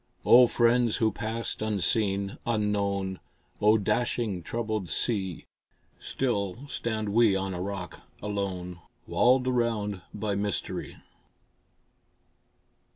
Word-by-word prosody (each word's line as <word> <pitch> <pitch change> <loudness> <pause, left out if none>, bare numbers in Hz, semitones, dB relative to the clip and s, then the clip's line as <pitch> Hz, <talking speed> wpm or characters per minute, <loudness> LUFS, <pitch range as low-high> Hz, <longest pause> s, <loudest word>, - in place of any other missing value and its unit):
O 125 +1 +8
friends 120 -1 +3
who 110 -1 +2
passed 115 0 -4
unseen, 100 -1 0
unknown! 100 -4 0 0.4
O 105 +1 +6
dashing, 105 -2 0
troubled 110 -1 -3
sea! 95 -7 -2 0.5
Still 120 0 -2
stand 110 -5 -2
we 110 -1 +4
on 95 0 -2
a 90 - -4
rock 95 -3 -5 0.2
alone, 95 -4 -4 0.3
Walled 125 +1 +3
round 115 -6 0
by 105 0 -2
mystery. 100 0 -3
105 Hz, 95 wpm, -28 LUFS, 100-115 Hz, 0.5 s, O